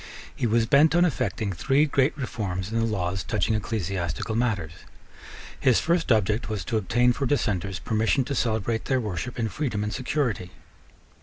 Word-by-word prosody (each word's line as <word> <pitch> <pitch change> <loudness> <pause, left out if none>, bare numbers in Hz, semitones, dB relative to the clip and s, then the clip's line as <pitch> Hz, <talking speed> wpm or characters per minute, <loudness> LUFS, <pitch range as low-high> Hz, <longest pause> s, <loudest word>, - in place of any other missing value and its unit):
He 120 - 0
was 115 +1 +2
bent 150 +5 +5
on 175 +1 +5
effecting 110 - -1
three 135 - +2
great 140 0 +1
reforms 100 -7 -4
in 115 - 0
the 115 - +2
laws 95 -3 -2
touching 110 0 0
ecclesiastical 100 -3 -2
matters. 110 -9 0 0.9
His 125 -3 +4
first 170 -3 +1
object 110 +1 +1
was 105 -5 -3
to 115 - 0
obtain 120 +4 +2
for 135 +2 -2
dissenters 100 -9 0
permission 110 - +1
to 140 - -4
celebrate 110 -2 -1
their 130 -1 +1
worship 105 +1 -4
in 115 -2 0
freedom 115 -5 -2
and 105 - -3
security. 125 -9 -1
110 Hz, 165 wpm, -25 LUFS, 100-130 Hz, 0.9 s, bent